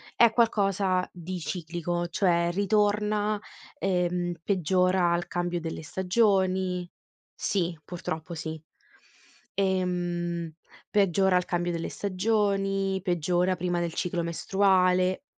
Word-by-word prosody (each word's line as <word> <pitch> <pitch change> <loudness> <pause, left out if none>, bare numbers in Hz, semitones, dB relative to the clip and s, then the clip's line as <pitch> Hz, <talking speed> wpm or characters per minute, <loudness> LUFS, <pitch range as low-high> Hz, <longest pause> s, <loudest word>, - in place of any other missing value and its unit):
È 235 -1 +6
qualcosa 195 -5 +2
di 180 +1 -6
ciclico, 175 +1 -3
cioè 170 -1 +2
ritorna, 210 +1 +1 0.4
ehm, 180 -4 0
peggiora 185 -1 +2
al 175 0 -1
cambio 175 0 -2
delle 160 -1 -5
stagioni. 185 -1 +1 0.5
Sì, 175 -4 -1
purtroppo 170 -1 -5
sì. 160 0 -5 1.0
Ehm, 175 -3 -1 0.4
peggiora 190 -1 +3
al 180 - 0
cambio 175 -1 -1
delle 165 -1 -3
stagioni, 195 -1 0
peggiora 180 0 +1
prima 175 0 -1
del 170 -1 -2
ciclo 175 -1 -1
mestruale, 185 - +2
180 Hz, 100 wpm, -27 LUFS, 175-195 Hz, 1.0 s, È